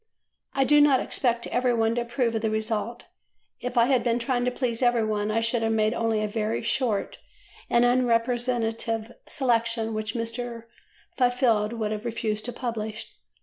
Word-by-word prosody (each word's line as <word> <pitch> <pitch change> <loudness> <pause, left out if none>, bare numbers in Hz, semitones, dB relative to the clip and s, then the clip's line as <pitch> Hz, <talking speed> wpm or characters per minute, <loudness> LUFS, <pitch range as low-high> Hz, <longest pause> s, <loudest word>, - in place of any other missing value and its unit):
I 270 - +3
do 295 +2 +5
not 285 -3 +5
expect 240 -2 0
every 245 0 +1
one 225 0 +2
to 240 - 0
approve 235 0 -1
of 225 - -1
the 220 - 0
result. 220 +2 -2 0.6
If 250 0 -5
I 235 - +6
had 255 -2 +2
been 235 -1 +1
trying 245 0 0
to - - +3
please 245 -2 -2
every 240 -3 +3
one, 210 -1 -1
I 225 +1 +1
should 230 +1 0
have 225 0 +1
made 215 0 +2
only 225 -2 0
a - - 0
very 215 +1 -2
short 230 -3 -1 0.5
and 235 0 +4
unrepresentative 235 -2 0 0.2
selection 230 -4 0
which 215 +1 -3
Mr. 230 0 -3 0.5
Fifield 245 -4 +2
would 220 -2 -2
have 215 +1 -4
refused 220 -2 -2
to 245 - -3
publish. 225 -2 -5
230 Hz, 175 wpm, -26 LUFS, 220-245 Hz, 0.6 s, I